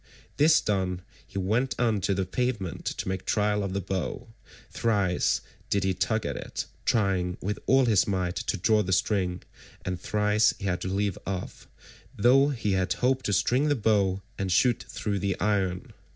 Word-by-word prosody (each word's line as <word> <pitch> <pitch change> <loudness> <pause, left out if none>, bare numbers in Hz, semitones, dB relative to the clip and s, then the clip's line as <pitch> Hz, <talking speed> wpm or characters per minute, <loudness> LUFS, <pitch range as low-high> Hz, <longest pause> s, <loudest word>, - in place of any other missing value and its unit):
This 155 +2 +5
done, 95 -3 -1 0.2
he - - -9
went 110 +8 0
on 115 -5 +2
to 100 - +1
the 95 0 -1
pavement 105 -3 -2
to - - -3
make 95 0 -2
trial 105 -1 +1
of 95 -1 -3
the 100 - 0
bow; 95 +6 -4 0.4
thrice 100 -6 +1 0.3
did 100 -1 +1
he 95 0 +1
tug 110 +4 -1
at - - -2
it, - - -5 0.2
trying 95 -5 +1
with 105 +2 -3
all 135 +1 +5
his 110 -5 +3
might 90 -2 -1
to 95 - -2
draw 110 +4 +3
the 95 -2 -1
string, 90 -2 0 0.4
and 90 -1 -3
thrice 105 +1 +2
he - - -7
had 90 -2 -1
to - - -3
leave 100 0 -1
off, 95 -1 -5 0.5
though 135 +6 +5
he 115 -7 -1
had 95 -1 +1
hoped 130 +1 0
to 100 - 0
string 130 +9 +2
the 145 - +2
bow 100 -5 +1 0.2
and 95 -1 -1
shoot 120 +6 +3
through 100 -2 -2
the 100 -1 -2
iron. 95 -3 -1
100 Hz, 180 wpm, -27 LUFS, 95-110 Hz, 0.5 s, This